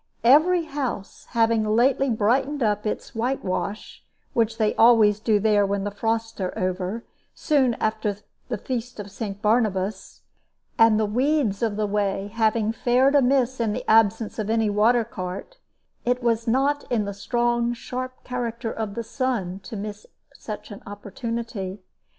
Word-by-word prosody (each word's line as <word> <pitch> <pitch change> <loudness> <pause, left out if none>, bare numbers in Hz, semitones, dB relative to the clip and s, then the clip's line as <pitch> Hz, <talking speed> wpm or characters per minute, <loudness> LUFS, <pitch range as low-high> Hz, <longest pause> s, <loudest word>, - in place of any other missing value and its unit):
Every 320 +8 +5
house 270 -10 -5
having 225 -1 +2
lately 245 +5 +2
brightened 255 +6 +1
up 210 -1 0
its - - -4
whitewash 225 -4 -3 0.3
which 225 -1 +1
they 215 -2 +2
always 225 -3 +5
do 215 -1 +2
there 210 -1 +3
when 200 0 -1
the 205 - -3
frosts 225 +1 -2
are 185 - -1
over, 185 +4 -2 0.3
soon 265 -6 +2
after 215 -2 -1 0.3
the - - -1
feast 245 -3 -5
of 205 -1 -7
St. 205 0 -6
Barnabas 210 -3 0 0.5
and 225 -1 +5
the 215 - +2
weeds 245 -1 +1
of 225 -3 0
the 215 0 0
way 200 -1 -1
having 220 -1 +1
fared 250 +4 +2
amiss 260 -2 +3
in 225 -3 0
the - - -5
absence 220 0 +3
of 215 -1 -2
any 225 -2 +2
water 225 +4 +3
cart, 195 - -7 0.4
it 245 0 0
was 230 -1 +1
not 275 +5 +2
in 220 -4 +1
the 200 - -4
strong, 240 +3 0
sharp 255 +2 -6
character 235 -2 -3
of 215 -2 -4
the 235 - -3
sun 225 -6 -2
to 210 - -9
miss 205 0 -6 0.3
such 210 0 -8
an 205 - -9
opportunity. 205 -1 -5
225 Hz, 155 wpm, -24 LUFS, 205-245 Hz, 0.5 s, Every